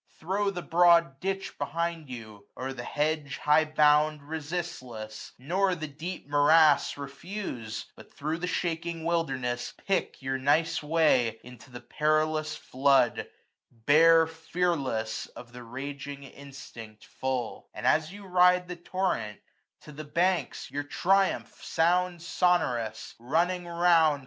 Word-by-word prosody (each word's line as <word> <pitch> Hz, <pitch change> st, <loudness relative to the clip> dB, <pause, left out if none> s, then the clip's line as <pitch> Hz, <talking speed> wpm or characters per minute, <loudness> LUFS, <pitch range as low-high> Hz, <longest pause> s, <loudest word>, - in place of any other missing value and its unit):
Throw 200 Hz, +4 st, -1 dB
the 180 Hz, -3 st, -5 dB
broad 170 Hz, -5 st, +4 dB
ditch 195 Hz, +2 st, -4 dB
behind 165 Hz, +1 st, -3 dB
you; 110 Hz, -5 st, -10 dB
o'er 130 Hz, +1 st, -4 dB
the 125 Hz, -2 st, -7 dB
hedge 150 Hz, 0 st, -1 dB
475 -, -, -12 dB
High 150 Hz, +1 st, +5 dB
bound, 150 Hz, 0 st, +3 dB
resistless; 145 Hz, -8 st, -6 dB
nor 185 Hz, +8 st, 0 dB
the 160 Hz, -2 st, -5 dB
deep 160 Hz, +3 st, -7 dB
morass 145 Hz, +1 st, +4 dB
Refuse; 140 Hz, -, -6 dB
but -, -, -15 dB
thro' 155 Hz, +3 st, -3 dB
the 180 Hz, +1 st, -3 dB
shaking 170 Hz, -2 st, -3 dB
wilderness 135 Hz, -8 st, -1 dB
Pick 195 Hz, -1 st, -1 dB
your 130 Hz, 0 st, -3 dB
nice 150 Hz, +5 st, +2 dB
way; 150 Hz, -8 st, +2 dB
into 125 Hz, +1 st, -13 dB
the 120 Hz, -1 st, -10 dB
perilous 155 Hz, +3 st, 0 dB
flood 135 Hz, -2 st, +2 dB, 0.4 s
Bear 160 Hz, +7 st, +5 dB
fearless, 160 Hz, -8 st, -2 dB
of 120 Hz, -1 st, -13 dB
the 125 Hz, -, -9 dB
raging 140 Hz, +3 st, -7 dB
instinct 130 Hz, -6 st, -12 dB
full; 130 Hz, -3 st, -4 dB
And 105 Hz, -, -7 dB
as 155 Hz, +5 st, +2 dB
you 200 Hz, 0 st, -11 dB
ride 180 Hz, -1 st, +4 dB
the 180 Hz, 0 st, -6 dB
torrent, 170 Hz, -, -2 dB, 0.4 s
to 150 Hz, -, -12 dB
the 150 Hz, +1 st, -8 dB
banks 175 Hz, +4 st, 0 dB
480 -, -, -15 dB
Your 145 Hz, +1 st, -2 dB, 0.2 s
triumph 195 Hz, +1 st, +1 dB
sound 175 Hz, +1 st, +1 dB
sonorous, 125 Hz, -12 st, 0 dB
running 175 Hz, +8 st, 0 dB
round. 170 Hz, -3 st, +3 dB
155 Hz, 135 wpm, -28 LUFS, 130-170 Hz, 0.4 s, High